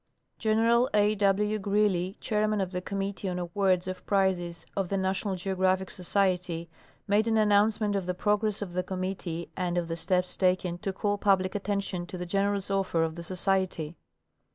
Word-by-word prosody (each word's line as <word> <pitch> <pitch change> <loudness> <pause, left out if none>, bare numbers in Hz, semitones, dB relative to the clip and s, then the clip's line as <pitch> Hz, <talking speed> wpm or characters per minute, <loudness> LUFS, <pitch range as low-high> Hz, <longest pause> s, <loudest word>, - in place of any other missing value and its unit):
General 230 +2 +3
A. 210 0 +4
W. 210 +1 +2
Greely, 195 -2 +1
chairman 215 0 0
of 190 -2 -1
the 180 -1 -3
committee 195 0 -3
on 180 - -3
awards 180 +1 +1
of 185 0 -5
prizes 175 -4 +1
of 195 -3 -1
The 195 - 0
National 190 +1 -1
Geographic 190 0 0
Society, 180 -2 0 0.4
made 210 +2 +3
an 225 -1 +2
an 215 -1 +3
nouncement 210 0 +3
of 190 -2 -2
the 180 - -1
progress 210 +1 0
of 180 -3 -8
the 180 - 0
committee 185 -2 -4
and 180 -1 -1
of 175 -1 0
the 165 - -1
steps 180 +2 0
taken 180 -2 +1
to 195 - -2
call 205 +1 -1
public 190 -2 +2
attention 200 -3 -2
to 185 - -7
the 180 - -4
generous 200 +2 0
offer 190 -4 +1
of 160 -1 -1
the 170 - -7
Society. 185 -3 -1
190 Hz, 175 wpm, -28 LUFS, 180-205 Hz, 0.4 s, A